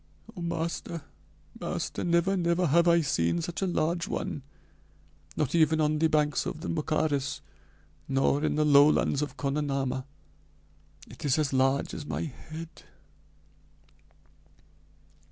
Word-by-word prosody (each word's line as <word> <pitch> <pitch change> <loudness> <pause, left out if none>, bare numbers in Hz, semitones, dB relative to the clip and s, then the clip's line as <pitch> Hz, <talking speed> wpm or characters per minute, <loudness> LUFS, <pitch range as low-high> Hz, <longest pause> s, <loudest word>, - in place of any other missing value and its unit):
"Oh, 180 - -7
master, 170 -1 -3 0.9
never 170 +3 +1
never 175 0 +1
have 170 +3 +4
I 170 0 +5
seen 135 - +1
such 170 +2 -4
a 190 - +1
large 170 0 0
one 145 - -3 1.0
not 145 -2 0
even 160 -1 +3
on 155 0 +2
the 160 - +4
banks 150 -1 +1
of 155 - -5
the - - -4
Mocaris 150 -3 -1 0.7
nor 135 +2 +1
in 155 - +1
the 150 0 +2
lowlands 145 -1 +5
of 150 - -4
Konanama. 135 -2 -1 1.0
It - - -12
is 145 -1 +2
as 150 -3 0
large 135 +1 +2
as 145 - -6
my - - -2
head 160 +2 -9
155 Hz, 125 wpm, -28 LUFS, 140-170 Hz, 1.0 s, I